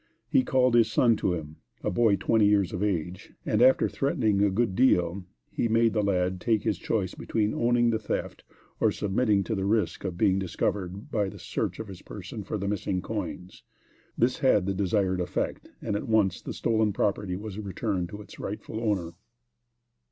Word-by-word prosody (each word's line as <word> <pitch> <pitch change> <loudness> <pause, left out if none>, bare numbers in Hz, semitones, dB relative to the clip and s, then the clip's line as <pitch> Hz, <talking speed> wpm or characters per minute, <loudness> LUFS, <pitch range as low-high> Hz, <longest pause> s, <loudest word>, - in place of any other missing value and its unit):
He - - +4
called 130 -1 +2
his 115 -2 +4
son 115 -1 +4
to 90 - 0
him, 75 -2 -8 0.3
a - - 0
boy 110 +1 +3
twenty 105 +2 +3
years 100 -3 +2
of 90 - -3
age, 95 -2 -2
and 105 - +1
after 130 +1 +5
threatening 125 - 0
a 100 - +4
good 100 0 0
deal, 90 -7 +2 0.3
he - - 0
made 115 0 +3
the 110 - +1
lad 90 -2 0
take 110 -3 +1
his 105 -5 -1
choice 95 -5 -1
between 110 -1 -1
owning 120 0 +2
the 110 - 0
theft 110 - -4 0.4
or - - +3
submitting 105 0 +1
to 115 - -3
the 95 -3 -1
risk 105 +2 0
of 90 -3 -4
being 95 +1 +3
discovered 95 +1 -3
by 105 -2 +1
a 100 +1 -8
search - - -3
of 110 - -6
his 95 -2 -10
person 105 +2 -8
for 110 - -3
the 100 0 -3
missing 100 -2 -2
coins. 100 -4 -5 0.6
This 125 +2 +1
had 115 -8 +3
the 100 - 0
desired 95 -1 0
effect, 90 - -3
and 105 - -1
at 105 - -3
once 105 -5 +2
the - - -6
stolen 110 -2 +1
property 100 -2 -1
was 105 +1 -6
returned 100 -3 -2
to 105 +2 -8
its 100 - -14
rightful 105 +2 -5
owner. 100 -7 -1
105 Hz, 190 wpm, -27 LUFS, 95-110 Hz, 0.6 s, after